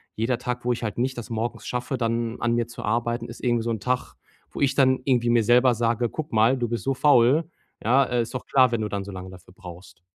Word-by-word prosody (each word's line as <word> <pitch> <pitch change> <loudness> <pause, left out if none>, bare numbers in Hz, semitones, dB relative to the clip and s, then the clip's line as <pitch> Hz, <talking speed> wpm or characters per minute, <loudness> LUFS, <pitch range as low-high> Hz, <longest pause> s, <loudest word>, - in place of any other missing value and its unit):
Jeder 115 +2 0
Tag, 125 -1 -5
wo 125 - +2
ich 120 - -6
halt 105 -3 -3
nicht 130 +2 -1
das 120 +1 -7
morgens 115 0 -4
schaffe, 125 +2 -3
dann 115 0 -2
an 120 -1 +1
mir 120 -1 0
zu 120 - -9
arbeiten, 120 +2 -1
ist 115 - -11
irgendwie 120 -2 +1
so 115 - -2
'n 110 - -2
Tag, 125 +5 -2 0.4
wo - - -8
ich 135 -1 +2
dann 130 -2 +3
irgendwie 120 -3 +2
mir 120 -1 +3
selber 125 +3 +4
sage: 115 +1 0
„Guck 155 +4 -6
mal, 115 +4 +4
du 120 -1 -1
bist 120 +1 -3
so 135 - 0
faul“, 145 +4 +4 0.3
ja? 130 +5 +4
Äh: 120 -1 0
„Ist 115 - -9
doch 130 - -5
klar, 130 -2 +4
wenn 115 -2 -1
du 105 - -2
dann 100 -1 -3
so 100 - -8
lange 95 0 -8
dafür 90 -1 -15
brauchst.“ 90 -3 -12
120 Hz, 260 wpm, -24 LUFS, 115-125 Hz, 0.4 s, selber